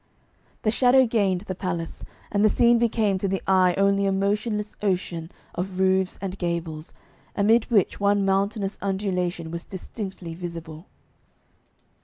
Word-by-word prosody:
The 215 Hz, -, +2 dB
shadow 255 Hz, +2 st, +5 dB
gained 200 Hz, -6 st, +1 dB
the 190 Hz, -2 st, -5 dB
palace, 175 Hz, -3 st, -4 dB, 0.3 s
and 205 Hz, -1 st, +2 dB
the 215 Hz, -, +6 dB
scene 235 Hz, +2 st, +4 dB
became 220 Hz, -4 st, +1 dB
to 195 Hz, -, -1 dB
the 195 Hz, 0 st, -2 dB
eye 185 Hz, -2 st, +4 dB
only 200 Hz, 0 st, +3 dB
a -, -, +2 dB
motionless 210 Hz, +2 st, -1 dB
ocean 180 Hz, -4 st, -1 dB, 0.2 s
of 185 Hz, +1 st, -4 dB
roofs 190 Hz, 0 st, +2 dB
and 195 Hz, 0 st, -4 dB
gables, 170 Hz, -3 st, -3 dB, 0.4 s
amid 220 Hz, +3 st, +3 dB
which 210 Hz, -6 st, +2 dB
one 200 Hz, 0 st, +2 dB
mountainous 195 Hz, +1 st, 0 dB
undulation 180 Hz, -4 st, -2 dB
was 170 Hz, +1 st, -6 dB
distinctly 190 Hz, -3 st, -7 dB
visible. 165 Hz, -1 st, -7 dB
195 Hz, 140 wpm, -25 LUFS, 180-205 Hz, 0.4 s, the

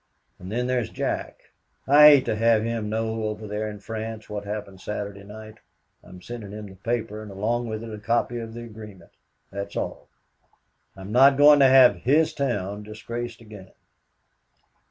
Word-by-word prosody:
And 90 Hz, +2 st, -9 dB
then 120 Hz, +3 st, -1 dB
there's 125 Hz, -2 st, -1 dB
Jack. -, -, -5 dB, 0.3 s
I 150 Hz, +2 st, +8 dB
hate 140 Hz, -3 st, +5 dB
to -, -, -1 dB
have 115 Hz, 0 st, +3 dB
him 115 Hz, -2 st, -3 dB
know 110 Hz, 0 st, -2 dB
over 105 Hz, 0 st, -4 dB
there 105 Hz, +1 st, -3 dB
in 105 Hz, -1 st, -9 dB
France 110 Hz, +1 st, -6 dB
what 105 Hz, -1 st, -5 dB
happened 100 Hz, -2 st, -6 dB
Saturday 100 Hz, -1 st, -6 dB
night. 110 Hz, +1 st, -11 dB, 0.4 s
I'm 90 Hz, -1 st, -14 dB
sending 115 Hz, -4 st, -8 dB
him 105 Hz, 0 st, -7 dB
the 95 Hz, -, -11 dB
paper 110 Hz, +1 st, -3 dB
and 110 Hz, -, -9 dB
along 115 Hz, +4 st, -2 dB
with 110 Hz, 0 st, -5 dB
it 115 Hz, -1 st, -8 dB
a 105 Hz, -, -7 dB
copy 120 Hz, +2 st, -1 dB
of 115 Hz, 0 st, -8 dB
the 120 Hz, -, -7 dB
agreement. 105 Hz, -4 st, -12 dB, 0.4 s
That's 100 Hz, 0 st, -6 dB
all. -, -, -4 dB, 0.9 s
I'm 95 Hz, +1 st, -9 dB
not 135 Hz, +3 st, +6 dB
going 145 Hz, 0 st, +7 dB
to 135 Hz, -, +7 dB
have 130 Hz, -1 st, +7 dB
his 155 Hz, +5 st, +2 dB
town 105 Hz, -7 st, -2 dB
disgraced 115 Hz, +2 st, -7 dB
again. 105 Hz, -4 st, -13 dB
110 Hz, 175 wpm, -24 LUFS, 105-120 Hz, 0.9 s, I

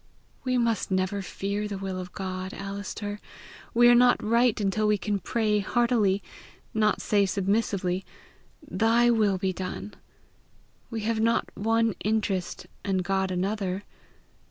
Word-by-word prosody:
"We 255 Hz, -1 st, +1 dB
must 230 Hz, -4 st, +1 dB
never 190 Hz, +1 st, 0 dB
fear 200 Hz, +2 st, -3 dB
the 205 Hz, -1 st, -4 dB
will 190 Hz, -1 st, -4 dB
of 180 Hz, -1 st, -7 dB
God, 185 Hz, -1 st, -5 dB
Alister! 200 Hz, +1 st, -5 dB, 0.5 s
We 240 Hz, 0 st, +5 dB
are 240 Hz, -, +8 dB
not 245 Hz, +1 st, +6 dB
right 235 Hz, +1 st, +3 dB
until 210 Hz, +1 st, +1 dB
we 210 Hz, 0 st, +3 dB
can 205 Hz, +1 st, -1 dB
pray 210 Hz, +2 st, +1 dB
heartily, 210 Hz, -2 st, +2 dB, 0.5 s
not 215 Hz, -1 st, +1 dB
say 200 Hz, -2 st, +3 dB
submissively, 195 Hz, -2 st, 0 dB, 0.6 s
'Thy 235 Hz, +2 st, +3 dB
will 210 Hz, -4 st, +2 dB
be 190 Hz, 0 st, -1 dB
done!' 190 Hz, +3 st, -5 dB, 1.0 s
We 225 Hz, -2 st, -4 dB
have 220 Hz, +1 st, 0 dB
not 230 Hz, +1 st, +1 dB
one 225 Hz, +1 st, +1 dB
interest, 205 Hz, -4 st, -1 dB, 0.2 s
and 190 Hz, -2 st, 0 dB
God 190 Hz, +1 st, 0 dB
another. 190 Hz, +1 st, -2 dB
205 Hz, 135 wpm, -27 LUFS, 190-225 Hz, 1.0 s, are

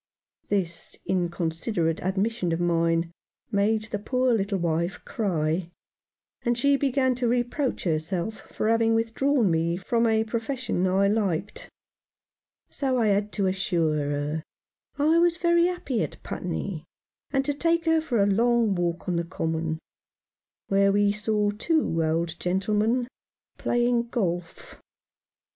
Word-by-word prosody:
This 180 Hz, -5 st, -2 dB
inconsiderate 170 Hz, -1 st, -1 dB
admission 190 Hz, 0 st, -1 dB
of 165 Hz, -, -1 dB
mine 165 Hz, -1 st, +1 dB, 0.4 s
made 215 Hz, +2 st, +2 dB
the 215 Hz, -1 st, -4 dB
poor 255 Hz, +3 st, +1 dB
little 200 Hz, -2 st, 0 dB
wife 170 Hz, 0 st, -1 dB
cry, 170 Hz, -, -1 dB, 0.7 s
and 240 Hz, 0 st, 0 dB
she 280 Hz, +3 st, +3 dB
began 270 Hz, -1 st, +2 dB
to 245 Hz, 0 st, -1 dB
reproach 245 Hz, +3 st, 0 dB
herself 170 Hz, +5 st, -2 dB
for -, -, -1 dB
having 225 Hz, 0 st, +3 dB
withdrawn 230 Hz, 0 st, +2 dB
me 165 Hz, +1 st, +1 dB
from 230 Hz, +5 st, +1 dB
a 220 Hz, 0 st, +3 dB
profession 230 Hz, -3 st, -2 dB
I 195 Hz, +2 st, +3 dB
liked; 205 Hz, -2 st, -1 dB, 1.0 s
so 265 Hz, -2 st, -1 dB
I 225 Hz, -3 st, +3 dB
had 205 Hz, +1 st, +1 dB
to 200 Hz, -, 0 dB
assure 175 Hz, -5 st, +1 dB
her 145 Hz, +2 st, -2 dB, 0.5 s
I 310 Hz, +3 st, +4 dB
was 340 Hz, -1 st, +3 dB
very 340 Hz, 0 st, +3 dB
happy 290 Hz, -10 st, -2 dB
at -, -, -5 dB
Putney, 175 Hz, -1 st, -4 dB, 0.5 s
and 270 Hz, -1 st, 0 dB
to 290 Hz, -, 0 dB
take 335 Hz, +3 st, +1 dB
her 325 Hz, -1 st, +3 dB
for 240 Hz, -10 st, +1 dB
a -, -, +3 dB
long 230 Hz, +1 st, +3 dB
walk 175 Hz, -1 st, -2 dB
on 175 Hz, -2 st, 0 dB
the 170 Hz, -, 0 dB
Common, 160 Hz, -2 st, -2 dB, 0.9 s
where 200 Hz, 0 st, +3 dB
we 205 Hz, 0 st, +3 dB
saw 210 Hz, 0 st, 0 dB
two 210 Hz, -, 0 dB
old 165 Hz, +1 st, -1 dB
gentlemen 210 Hz, +6 st, +1 dB, 0.5 s
playing 240 Hz, 0 st, +1 dB
golf. 175 Hz, -7 st, -3 dB
205 Hz, 135 wpm, -26 LUFS, 170-240 Hz, 1.0 s, I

